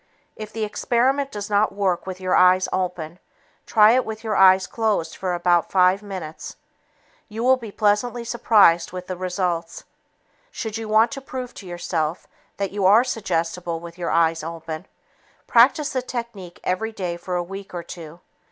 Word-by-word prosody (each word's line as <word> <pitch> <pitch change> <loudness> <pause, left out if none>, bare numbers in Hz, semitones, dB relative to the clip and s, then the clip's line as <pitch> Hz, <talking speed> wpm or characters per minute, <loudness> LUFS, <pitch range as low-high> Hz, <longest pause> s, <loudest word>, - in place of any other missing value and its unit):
If 215 -1 -8
the 220 0 -3
experiment 255 +6 0
does 205 -1 -5
not 205 -1 +2
work 190 -3 -1
with 185 -1 -6
your 185 -1 -1
eyes 185 0 +5
open, 180 -2 -3 0.5
try 215 -1 +6
it 255 +2 +3
with 220 0 -7
your 220 -2 -1
eyes 190 0 +6
closed 215 -5 -1
for 185 -2 -2
about 175 -1 +2
five 185 +1 +4
minutes. 185 -6 -7 0.7
You 220 +2 -5
will 260 +1 +5
be 230 -5 -9
pleasantly 215 +4 0
surprised 215 -7 +3
with 180 0 -7
the 185 - -5
results. 180 -2 -3 0.7
Should 220 - -5
you 225 -1 -5
want 220 +2 +4
to 275 - -6
prove 255 -1 -7
to 195 - -11
yourself 170 -2 -3 0.3
that 200 -2 -2
you 200 0 -3
are 215 +5 +6
suggestible 175 -7 -2
with 170 +1 -11
your 170 - -2
eyes 165 -1 +2
open, 165 +1 -6 0.6
practice 280 +6 +4
the 260 - -1
technique 235 -8 -7
every 205 +5 -1
day 185 -6 -4
for 180 +1 -5
a 175 - 0
week 195 +2 -9
or 175 -1 -5
two. 170 0 -10
190 Hz, 170 wpm, -22 LUFS, 175-225 Hz, 0.7 s, try